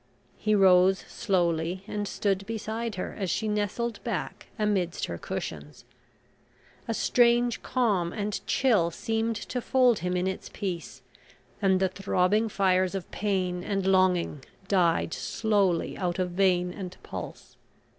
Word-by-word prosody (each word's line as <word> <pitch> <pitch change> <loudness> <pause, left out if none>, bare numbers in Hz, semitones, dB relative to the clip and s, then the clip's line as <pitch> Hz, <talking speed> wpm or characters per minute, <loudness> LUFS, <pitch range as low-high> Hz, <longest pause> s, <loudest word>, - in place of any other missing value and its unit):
He 215 0 +2
rose 190 -1 +6
slowly 175 -3 0
and 205 0 -3
stood 195 -1 -1
beside 225 0 -3
her, 185 - -5
as 190 -3 -1
she 220 +6 -1
nestled 210 +3 -2
back - - -4
amidst 200 -5 0
her 85 -1 -6
cushions. 75 -1 -6 1.0
A 230 - 0
strange 240 0 +3
calm 205 -9 +1
and 205 0 -3
chill 220 -11 +3
seemed 225 +6 -1
to 245 +4 -4
fold 250 -3 +3
him 180 +2 -1
in 180 - 0
its 190 0 -4
peace, 185 -5 -5 0.6
and 190 -2 +3
the 190 - +3
throbbing 195 +3 +1
fires 185 -2 +2
of 190 -3 -5
pain 185 -3 -1
and 195 -1 -1
longing 185 -6 +2 0.2
died 175 -4 +2
slowly 200 -6 0
out 180 -2 -1
of 180 -1 -1
vein 180 -1 +2
and 185 -2 -7
pulse. - - -8
195 Hz, 135 wpm, -27 LUFS, 180-215 Hz, 1.0 s, rose